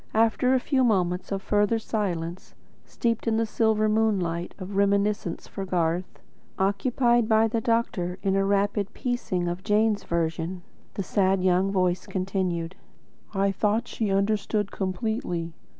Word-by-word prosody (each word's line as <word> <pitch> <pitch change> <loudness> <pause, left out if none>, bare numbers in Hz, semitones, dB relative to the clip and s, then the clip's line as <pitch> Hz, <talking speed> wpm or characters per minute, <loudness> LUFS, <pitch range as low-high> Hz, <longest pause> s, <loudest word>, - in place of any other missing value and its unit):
After 230 +3 +3
a - - +3
few 260 0 +1
moments 180 -6 +1
of 195 -1 -2
further 210 +2 +2
silence, 185 -6 -3 0.3
steeped 230 -1 -2
in 220 -1 +2
the 225 - +2
silver 220 -1 +2
moonlight 195 -6 0
of 195 +1 -7
reminiscence 200 -2 +1
for 195 - -6
Garth; 175 -1 -1 0.4
occupied 235 +4 +2
by 220 0 +5
the 225 +1 -1
doctor 205 -6 0
in 195 -1 +1
a 195 - +3
rapid 200 0 0
piecing 240 -7 -2
in - - -1
of 175 +2 -4
Jane's 210 0 +2
version; 170 +1 -2 0.3
the 195 - -2
sad 190 -1 +1
young 185 +1 +3
voice 185 -2 0
continued: 185 -2 -2 0.6
"I 195 0 +2
thought 215 +4 0
she 220 -3 -2
understood 200 +1 0
completely. 185 -3 -2
200 Hz, 145 wpm, -26 LUFS, 185-220 Hz, 0.6 s, by